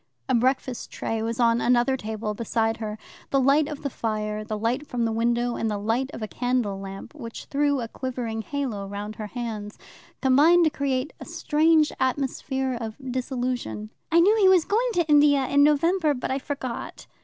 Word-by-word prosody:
A 260 - +1
breakfast 255 0 0
tray 225 -1 -3
was 230 +1 -3
on 230 -1 +3
another 245 +2 +3
table 220 -3 -4
beside 225 0 -1
her. 215 -1 -5 0.3
The 275 - +2
light 280 +3 +4
of 300 -1 -7
the 280 - -1
fire, 215 -2 -3
the 215 0 -4
light 240 +7 -1
from 240 -2 -1
the 225 - 0
window, 235 +2 0
and 225 - -1
the 210 - -1
light 225 +6 -1
of 220 - -7
a - - -2
candle 245 -5 -1
lamp, 195 0 -8
which 235 -7 -8
threw 285 -1 +1
a 230 - -3
quivering 240 -3 -4
halo 235 -7 -3
round 205 +2 -6
her 215 - -5
hands, 220 -3 -5 0.4
combined 295 +7 +5
to 315 - +3
create 275 -1 -1
a - - -8
strange 310 0 +2
atmosphere 265 0 -1
of 220 -1 -5 0.2
dissolution. 250 -4 -3 0.2
"I 335 +1 +6
knew 410 +5 +5
he 390 -3 +6
was 365 -4 +5
going 470 +4 +1
to 345 -1 +2
India 290 -2 +5
in 285 +2 +4
November, 300 +1 +3
but 250 - -3
I 265 - 0
forgot." 265 -3 -5
250 Hz, 190 wpm, -25 LUFS, 225-285 Hz, 0.4 s, I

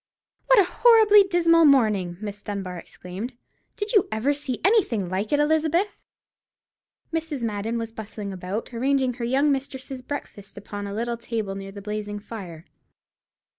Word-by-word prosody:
"What - - +6
a 405 - +8
horribly 430 +1 +6
dismal 335 -3 +4
morning!" 215 - +3
Miss 205 -1 -6
Dunbar 190 -4 -5
exclaimed. 185 +9 -8 0.4
"Did 420 0 -3
you 410 -5 +4
ever 225 +7 +1
see 280 -3 -3
anything 295 - +2
like 195 +3 -2
it, 290 - +3
Elizabeth?" 315 +6 +1 1.1
Mrs. 320 -6 -3
Madden 220 +1 -2
was 230 -1 -4
bustling 210 -2 -7
about, 190 +6 -5
arranging 260 +1 +1
her 240 -1 -4
young 275 +4 +2
mistress's 270 -1 -4
breakfast 250 -8 -7
upon 205 0 -6
a 200 - -5
little 235 +1 -2
table 225 -4 -3
near 195 0 -7
the 200 0 -10
blazing 210 0 -4
fire. 190 -6 -9
235 Hz, 150 wpm, -24 LUFS, 205-290 Hz, 1.1 s, a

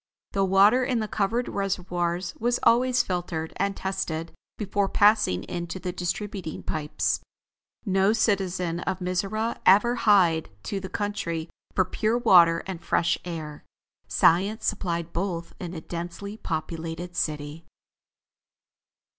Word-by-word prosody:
The 195 - +1
water 200 +6 +5
in 250 -1 0
the 215 -1 -1
covered 220 +4 0
reservoirs 180 -2 -2
was 240 +2 +1
always 250 +1 +4
filtered 175 -3 -3
and 200 +1 -1
tested 170 -4 -3 0.3
before 200 -1 0
passing 205 - +3
into 175 +1 -5
the 180 0 -3
distributing 185 -1 -4
pipes. 150 -1 -1 0.7
No 195 0 +3
citizen 185 -6 0
of 185 +1 -2
Mizora 195 +5 -1
ever 210 +6 +5
hied 180 -8 +4
to 200 - -3
the 190 -1 -7
country 170 -6 -3 0.2
for 185 - +3
pure 220 +5 0
water 170 -8 +6
and 185 -3 -6
fresh 170 - +1
air. 155 -4 -6 0.4
Science 195 +6 +3
supplied 170 -2 -2
both 170 -1 -3
in 175 -1 -6
a 160 - -5
densely 175 +5 -6
populated 165 -1 -5
city. 150 +1 -3
185 Hz, 125 wpm, -26 LUFS, 170-205 Hz, 0.7 s, water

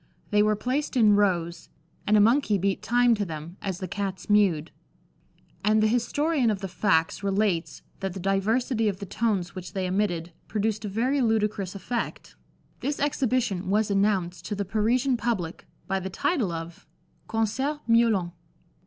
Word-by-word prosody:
They 210 0 +4
were 215 0 +3
placed 260 +5 -2
in 215 -3 +6
rows, 175 -4 0 0.4
and 210 +1 +5
a - - +6
monkey 220 0 +4
beat 195 +1 0
time 245 0 +3
to 210 -2 0
them, 165 0 -7
as 190 -3 -3
the 185 -1 -5
Cats 195 +1 -4
mewed; 180 -7 +3 0.9
and 215 +2 +3
the 215 - +3
historian 255 +4 +1
of 205 -2 -1
the 195 - -3
facts 175 -3 +1
relates 195 -3 0 0.2
that 195 -2 -3
the - - -5
diversity 220 +5 +1
of 195 - -4
the 200 - -6
tones 195 -4 -1
which 185 -2 -8
they 190 -1 -2
emitted 180 -3 -1
produced 215 0 -1
a - - -3
very 250 +7 +1
ludicrous 210 -4 0
effect. 235 +4 -4 0.4
This 285 +3 -2
exhibition 255 -9 0
was 210 +1 +2
announced 195 -3 +1
to 210 - -2
the 200 0 -2
Parisian 235 +6 +1
public 195 -9 -3 0.2
by 195 0 -1
the 190 0 -5
title 220 - 0
of 165 0 -7 0.4
"Concert 265 +7 -1
Miaulant." 230 -6 +3
205 Hz, 160 wpm, -26 LUFS, 190-230 Hz, 0.9 s, in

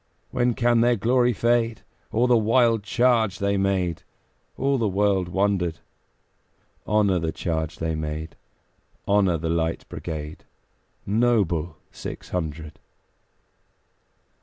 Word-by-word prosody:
When 120 -1 +1
can 120 -1 +3
their 120 +1 +4
glory 120 +3 +2
fade? 115 0 +1 0.3
O 115 +3 +2
the 125 -1 +4
wild 115 0 +3
charge 115 -2 +2
they 100 0 0
made! 95 -3 0 0.6
All 135 0 +1
the 110 - +1
world 100 -2 +1
wondered. 95 -3 0 1.1
Honor 100 -3 +2
the 80 -1 -2
charge 80 -2 -3
they 80 0 -2
made! 80 +1 -5 0.7
Honor 100 -4 +3
the 80 +1 -3
Light 80 0 -1
Brigade, 75 -2 -6 0.6
Noble 100 -8 +1
six - - -8
hundred! 80 -3 -5
100 Hz, 110 wpm, -24 LUFS, 85-115 Hz, 1.1 s, their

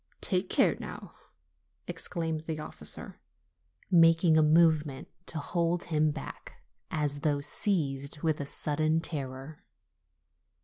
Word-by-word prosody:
'Take 185 -1 +2
care, - - +3
now!" - - -8 0.7
exclaimed 160 -2 -3
the 160 -1 -3
officer, 155 - -6 0.7
making 165 -1 +5
a 160 - +5
movement 155 -3 +3 0.2
to 165 - -4
hold 170 +3 -1
him 155 -1 +1
back, 150 - -9 0.3
as 150 -3 -1
though 145 -1 0
seized 140 -4 +1
with 155 -2 0
a 140 - -5
sudden 155 +2 0
terror. 140 -2 -3
155 Hz, 115 wpm, -29 LUFS, 145-165 Hz, 0.7 s, making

